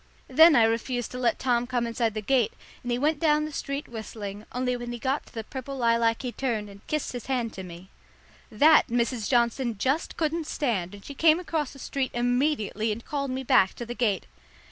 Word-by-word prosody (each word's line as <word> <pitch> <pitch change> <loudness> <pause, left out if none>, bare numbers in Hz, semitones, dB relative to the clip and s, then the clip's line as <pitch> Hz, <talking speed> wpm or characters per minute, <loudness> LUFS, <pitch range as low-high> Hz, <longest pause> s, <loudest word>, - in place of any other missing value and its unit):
Then 320 +4 +7
I 235 - +6
refused 235 +2 0
to 250 - -5
let 240 -3 +1
Tom 245 -2 +1
come 245 -1 0
inside 230 -1 -1
the 215 - -3
gate, 245 0 +2 0.3
and 245 - -4
he 240 - +1
went 295 +3 +1
down 305 -2 +3
the 305 - -6
street 280 +1 -4
whistling, 215 -2 -7
only 250 0 -1
when 240 0 -5
he 240 - -4
got 265 +5 -2
to - - -18
the 225 - -3
purple 265 +4 -7
lilac 230 -1 +2
he 250 - -3
turned 225 -6 -2
and 200 0 -14
kissed 305 -1 -2
his 245 -3 -7
hand 245 -4 -1
to 190 - -7
me. 180 +1 -11 0.6
That, 300 +9 +6
Mrs. 235 -2 -1
Johnson 235 -1 +1
just 270 +9 -1
couldn't 320 0 -1
stand, 205 - -1
and 200 - -14
she 285 - -7
came 315 +3 +4
across 320 -5 -2
the - - -13
street 270 -1 -2
immediately 240 -3 0
and 225 +2 -5
called 280 -2 -2
me 260 +1 -3
back 190 -6 +4
to 240 - -6
the 240 - -5
gate. 220 -7 0
245 Hz, 215 wpm, -27 LUFS, 225-275 Hz, 0.6 s, Then